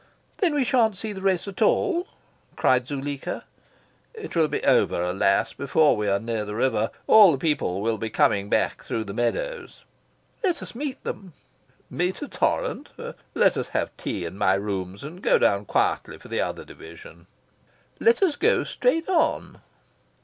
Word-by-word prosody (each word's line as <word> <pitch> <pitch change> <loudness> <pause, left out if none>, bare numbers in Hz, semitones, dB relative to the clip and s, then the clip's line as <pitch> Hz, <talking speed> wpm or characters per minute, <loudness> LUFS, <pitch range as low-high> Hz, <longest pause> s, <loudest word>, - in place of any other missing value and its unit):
"Then 345 -7 +1
we 285 - +2
shan't 230 -5 +2
see 215 +1 -4
the 190 - -8
race 190 -1 +1
at 195 - -8
all?" 360 -3 +2 0.5
cried 125 -1 +2
Zuleika. 140 0 -4 0.7
"It 440 - -8
will 160 -2 +4
be - - -3
over, - - +3
alas, 95 +2 +1
before 150 +2 +3
we 105 -1 -2
are 100 0 +2
near 115 0 -3
the 105 0 -6
river. 115 -2 +1 0.2
All 210 -5 +8
the 140 - 0
people 130 - -1
will 110 0 -1
be 110 - -3
coming 100 -1 +2
back - - 0
through 110 - -3
the 100 -2 -7
meadows." 485 - -3 0.6
"Let 360 -5 0
us - - -9
meet 275 +2 -5
them." 185 -4 -6 0.6
"Meet 180 +2 -1
a - - -5
torrent? - - -1 0.5
Let - - +4
us - - -2
have - - -2
tea 90 - -4
in 90 +4 -7
my 95 -2 +3
rooms 95 -1 -4
and 165 +6 -9
go - - +4
down 100 +1 +2
quietly - - 0
for - - -15
the - - 0
other - - -4
Division." 85 +1 -13 0.7
"Let 460 -3 +3
us 335 -6 +2
go 455 +10 +2
straight 330 -10 0
on." 360 -4 0
140 Hz, 170 wpm, -24 LUFS, -, 0.7 s, All